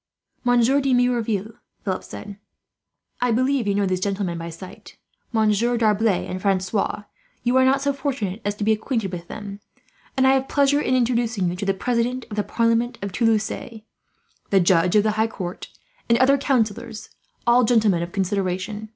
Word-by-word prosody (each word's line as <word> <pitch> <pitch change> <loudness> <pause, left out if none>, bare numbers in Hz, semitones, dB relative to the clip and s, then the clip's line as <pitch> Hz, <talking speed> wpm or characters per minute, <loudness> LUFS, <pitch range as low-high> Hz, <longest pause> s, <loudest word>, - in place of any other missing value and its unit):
"Monsieur 245 +3 +3
de 265 -2 +2
Merouville," 230 -4 0 0.3
Philip 190 -2 -2
said, 205 -1 -9 0.8
"I 245 - +2
believe 255 0 +1
you 200 - +1
know 200 0 +1
these 185 -1 0
gentlemen 190 -3 -2
by 165 0 -6
sight. 170 +3 -12 0.3
"Monsieur 225 +1 +2
D'Arblay 215 -3 +2
and 185 0 -5
Francois, 195 +2 0 0.4
you 245 +1 +1
are 260 - +5
not 270 +1 +2
so 280 0 +1
fortunate 250 -7 -3
as 205 0 -2
to 210 - -4
be 220 - +3
acquainted 220 -2 -1
with 170 -1 -7
them; 205 -2 -8 0.6
and 265 - +4
I 265 - +6
have 270 0 +1
pleasure 285 0 +3
in 255 - +1
introducing 230 -7 0
to 180 - -8
you 200 - -2
the 195 - +1
President 245 +3 -1
of - - -4
the 210 - +1
Parliament 230 +2 0
of 200 - -3
Toulouse, 220 0 -1 0.7
the 195 - +4
Judge 175 +1 +3
of 210 - +5
the 215 - +2
High 220 - +3
Court, 185 -5 -6 0.4
and 235 - +5
other 260 +3 +5
councillors, 235 -4 -1 0.4
all 240 +1 +5
gentlemen 215 -7 +3
of 170 +1 -4
consideration. 195 +2 -2
220 Hz, 175 wpm, -23 LUFS, 195-245 Hz, 0.8 s, I